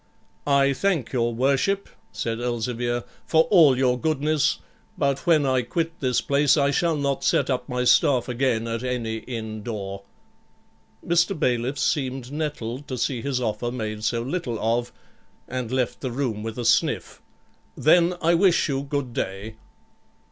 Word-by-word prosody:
'I 140 -1 +4
thank 165 - -1
your 120 -2 +1
worship,' 140 +11 +1 0.2
said 115 0 -3
Elzevir, 120 0 -2 0.2
'for 160 0 +5
all 155 -9 +6
your 125 -1 +2
goodness; 150 0 +1 0.4
but 140 +1 -1
when 155 -4 +4
I 130 -1 +2
quit 165 +7 -3
this 125 -3 +1
place, 140 +1 +3
I 140 -1 +3
shall 165 +2 +1
not 140 -2 -1
set - - +2
up 125 -1 -2
my 125 0 -1
staff 125 -1 +4
again 120 -2 0
at 115 0 -3
any 120 -3 -2
inn 110 -2 -6
door.' 100 -3 -5 1.0
Mr. 170 +2 +2
Bailiff 125 +2 0
seemed 130 -3 -1
nettled 145 -4 -4
to 130 - -4
see 125 0 -1
his 135 -1 -1
offer 120 0 -2
made 110 -3 -4
so 115 +1 0
little 130 -4 -3
of, 120 +2 0 0.6
and 125 -2 -4
left 130 -2 -1
the 130 - -2
room 120 -4 -2
with 110 +1 -5
a 120 - -3
stiff, - - +1 0.6
'Then 170 +3 +4
I 170 +1 +4
wish 175 0 +3
you 135 -1 -1
good 140 -3 -3
day.' 100 +3 -4
130 Hz, 155 wpm, -24 LUFS, 120-145 Hz, 1.0 s, all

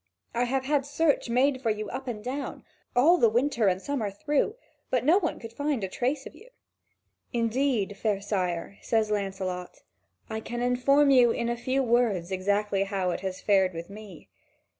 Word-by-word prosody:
I 240 +1 +1
have 265 +1 -1
had 290 0 +2
search 285 -1 +1
made 260 +2 +2
for 230 - 0
you 215 0 -2
up 260 +1 -6
and 215 -4 -5
down, 270 +4 -5 0.3
all 325 +8 +5
the 230 - +5
winter 235 -1 +1
and 185 -1 +2
summer 235 -2 -2
through, 290 - 0 0.3
but 250 -1 0
no 340 +7 +5
one 335 -5 -2
could 230 0 -9
find 285 -3 -1
a - - 0
trace 260 +8 -2
of - - -9
you." 455 +4 -16 0.8
"Indeed, 230 -3 0
fair 210 -2 0
sire," 190 -2 -3
says 220 -2 +1
Lancelot, 190 -3 -3 0.4
"I 220 - -4
can 240 +2 -5
inform 275 +4 +4
you 250 -3 +6
in 235 +1 -1
a 235 - 0
few 260 +3 0
words 230 -7 +1
exactly 200 +1 0
how 195 -2 -1
it - - -3
has 190 -1 -5
fared 190 -3 +3
with 170 +3 -7
me. 200 -5 -11
230 Hz, 185 wpm, -27 LUFS, 200-265 Hz, 0.8 s, you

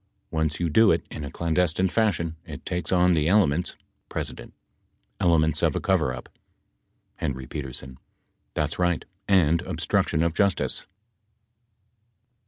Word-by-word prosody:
Once 80 -1 -1
you 85 - +1
do 110 +7 +5
it - - +1
in 75 - -6
a 70 - -5
clandestine 85 +3 +1
fashion, 90 -6 0
it 75 -3 -9
takes 90 0 -3
on 90 -1 +4
the 80 -3 +2
elements 90 -4 +2 0.2
— - - -48
P. - - -2 1.0
Elements 80 -3 +3
of - - +2
a - - +1
coverup. 65 -1 0 0.9
HP. 65 -2 -5 0.6
That's 75 +3 -1
right, 90 -2 +1 0.2
and 85 -4 +4
obstruction 85 -1 0
of 85 -1 +1
justice. 100 0 0
85 Hz, 125 wpm, -25 LUFS, 75-90 Hz, 1.0 s, do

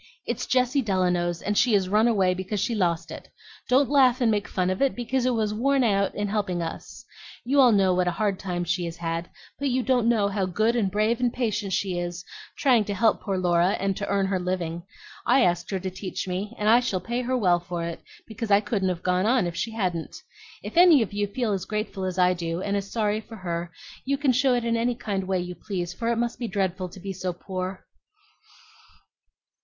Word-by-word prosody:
It's - - -3
Jessie 255 +2 +2
Delano's, 180 -5 0
and 205 - -1
she 240 +2 +3
has 195 -2 +3
run 210 +4 +3
away 195 -6 +3
because 190 +3 -3
she 235 - 0
lost 175 -6 0
it. - - -9 0.4
Don't 265 +2 +4
laugh 260 -3 +4
and 235 -3 +3
make 205 -1 -1
fun 185 0 0
of 185 - -3
it, 275 -1 +2
because 250 +1 -1
it 250 - +1
was 215 -2 0
worn 270 +4 +2
out 200 -3 +1
in 205 0 -1
helping 200 -4 -1
us. 170 +7 -6 0.4
You 275 +3 +2
all 255 -3 +7
know 195 -3 +3
what 180 0 +1
a - - +2
hard 205 -3 0
time 180 -2 -3
she 175 +1 -1
has 165 0 -6
had, 165 0 -3 0.3
but 280 -1 0
you 255 0 0
don't 245 -3 +2
know 215 -4 +3
how 200 -2 -1
good 215 +6 +1
and 215 -5 +1
brave 215 +4 +1
and 245 -1 +1
patient 210 -5 -2
she 185 -2 -1
is, 175 +1 -5 0.3
trying 250 -6 +4
to 205 - -3
help 225 +3 +2
poor 195 -3 -2
Laura 175 +1 +2
and 195 0 0
to 200 - -3
earn 200 -1 +1
her 190 -1 0
living. 175 -2 -3 0.5
I 270 - +5
asked 175 -1 0
her 195 - -2
to 185 0 -4
teach 185 0 -5
me, 195 +5 -4
and 210 - -1
I 230 +3 +7
shall 245 -7 -1
pay 235 +5 -3
her 255 +1 -1
well 180 -6 +3
for 175 0 -5
it, 170 0 -5 0.2
because 225 0 -6
I 200 0 +6
couldn't 205 -3 -1
have 180 -2 -4
gone 180 +2 +1
on 245 -4 +3
if 170 -1 -4
she 225 - -2
hadn't. 185 -7 -3 0.5
If - - -7
any 340 -8 +7
of 205 - -8
you 205 0 0
feel 220 +1 -1
as 190 -2 -3
grateful 210 -3 -3
as 185 0 -3
I 180 0 +4
do, 170 -1 -3
and 200 +1 -2
as 200 -1 -3
sorry 215 -1 0
for 225 - -12
her, 170 -3 -4 0.3
you 275 +1 0
can 280 -2 +2
show 255 0 +3
it 240 -1 -1
in 230 0 +1
any 235 +1 0
kind 195 -5 -3
way 190 -1 +1
you 180 0 -5
please, 180 -2 -4
for 230 +4 -2
it - - +1
must 235 0 -2
be 240 - -2
dreadful 190 -2 -2
to 190 - -12
be 195 +1 -5
so 185 0 -3
poor." 185 +1 -6
200 Hz, 235 wpm, -25 LUFS, 180-235 Hz, 0.5 s, all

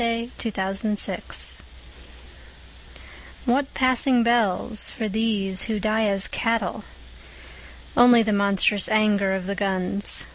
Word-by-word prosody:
Anthem 230 +1 -3
for 190 -1 -3
Doomed 210 +1 -2
Youth - - -2 1.8
What 270 +3 0
passing 255 -1 +3
bells 230 -2 +2
for 220 - -5
these 205 -3 -2
who 220 -2 -3
die 215 +2 0
as 195 -1 0
cattle? 230 -1 -2 1.1
Only 240 -1 +5
the 215 -1 -1
monstrous 200 0 +2
anger 210 -3 +1
of 190 -1 -5
the 200 - -3
guns. 195 0 +2
215 Hz, 115 wpm, -22 LUFS, 200-230 Hz, 1.8 s, Only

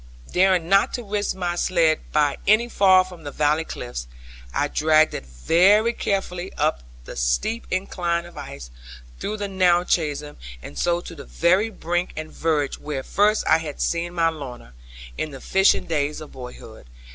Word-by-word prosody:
Daring 185 -2 +3
not 195 +2 +3
to 245 - -5
risk 205 -1 -2
my 175 -2 -2
sledd 170 -3 +2
by 145 -2 +2
any 215 +3 +5
fall 190 -5 +5
from 180 -3 -12
the 145 - -5
valley 150 +2 +1
cliffs, - - -6 0.4
I 145 - 0
dragged 155 +1 +3
it 65 - -6
very 185 - +3
carefully 190 -3 -2
up 150 - 0 0.2
the - - -8
steep - - -1
incline 175 -2 -1
of 175 - -13
ice, 140 - -9 0.5
through 215 +1 -3
the 205 -1 -3
narrow 180 -2 +3
chasm, 150 -4 -1 0.3
and 70 - -9
so 175 - 0
to 175 - -9
the 145 -4 -10
very 185 +6 +2
brink 175 -3 -2
and 155 0 -6
verge 150 -4 -1
where 145 -3 -4
first 210 +7 +2
I 160 - +4
had 155 -3 -7
seen 170 +1 -1
my 165 -1 +3
Lorna, 130 - -9 0.5
in 155 - -2
the 135 -2 -9
fishing 190 +7 +3
days 150 -2 -1
of 155 - -10
boyhood. 125 - -11
170 Hz, 170 wpm, -23 LUFS, 145-185 Hz, 0.5 s, any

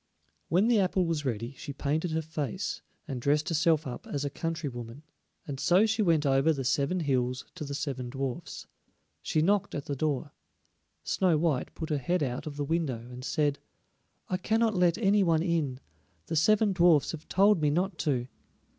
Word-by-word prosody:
When 190 +6 +3
the 235 -3 +4
apple 185 -1 +2
was 160 -3 -2
ready 120 0 -3
she 145 - -6
painted 150 +5 -1
her 160 0 -1
face, 160 +2 -4 0.3
and 130 -5 -4
dressed 150 +6 +1
herself 165 -1 +2
up 125 -2 -7
as 145 0 -3
a 140 - -2
country 165 0 -3
woman, 120 +2 -8 0.4
and 135 -2 -5
so 185 +7 +4
she 220 0 +1
went 165 -6 +3
over 135 +3 +3
the 140 -4 -2
seven 140 +7 +1
hills 130 -3 0
to 180 - -7
the 140 -1 -4
seven 135 -3 -3
dwarfs. 135 -1 -5 0.6
She 155 - +1
knocked 200 +2 +1
at 145 - -4
the 140 - -3
door. 145 0 -2 0.7
Snow 180 -4 +2
white 150 -5 0
put 160 -1 -5
her 150 - +1
head 175 +5 0
out 130 +3 -3
of 145 - -6
the 145 0 -2
window 140 -7 -2
and 125 +1 -9
said: 145 -1 0 0.7
"I 185 - -1
cannot 220 +3 +1
let 180 -2 +3
any 205 -1 +3
one 165 -3 +3
in; 160 -7 -1 0.5
the - - -3
seven 210 +5 +4
dwarfs 170 -5 +4
have 160 -1 -9
told 200 -2 +4
me 150 - +3
not 180 +4 -1
to." 130 -5 0
155 Hz, 190 wpm, -29 LUFS, 140-175 Hz, 0.7 s, the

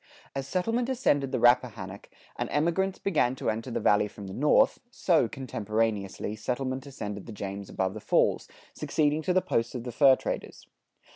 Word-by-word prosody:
As 135 -1 -4
settlement 225 - 0
ascended 145 - +1
the 130 - 0
Rappahannock, 115 -5 +1 0.3
and - - -3
emigrants 170 +5 +1
began 145 -10 +1
to - - -1
enter 115 +4 -5
the 120 - -2
Valley 105 0 +3
from 105 -1 -10
the 95 - -7
north, 150 - +3
so, 170 - +2
contemporaneously, 110 -5 -2
settlement 130 +4 -3
ascended 105 -7 -6
the - - -7
James 100 -1 -6
above 95 0 -1
the 110 - -6
falls, - - +2 0.3
succeeding 150 0 0
to 180 - 0
the 185 0 +3
posts 115 +2 -1
of 120 - -4
the 125 - -5
fur 135 +2 +6
traders. - - -5
125 Hz, 170 wpm, -28 LUFS, 105-150 Hz, 0.3 s, fur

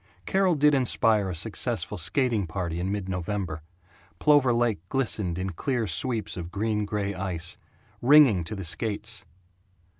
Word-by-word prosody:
Carol 190 -3 +2
did 150 0 +4
inspire 115 -6 +2
a 90 - -4
successful 105 +2 -1
skating 110 - +1
party 85 -1 -3
in 95 +2 -2
mid 100 -2 -3
November. 90 -3 -3 0.6
Plover 145 -4 +4
Lake 120 -4 +1
glistened 105 -9 -1
in 95 +1 -3
clear 120 - -1
sweeps 100 +1 -2
of 85 -1 -6
gray 110 +2 -1
green 100 -1 -2
ice, 90 -3 -4 0.5
ringing 130 - +6
to 105 - -5
the 95 -2 -6
skates. 105 +3 -3
105 Hz, 145 wpm, -26 LUFS, 90-120 Hz, 0.6 s, ringing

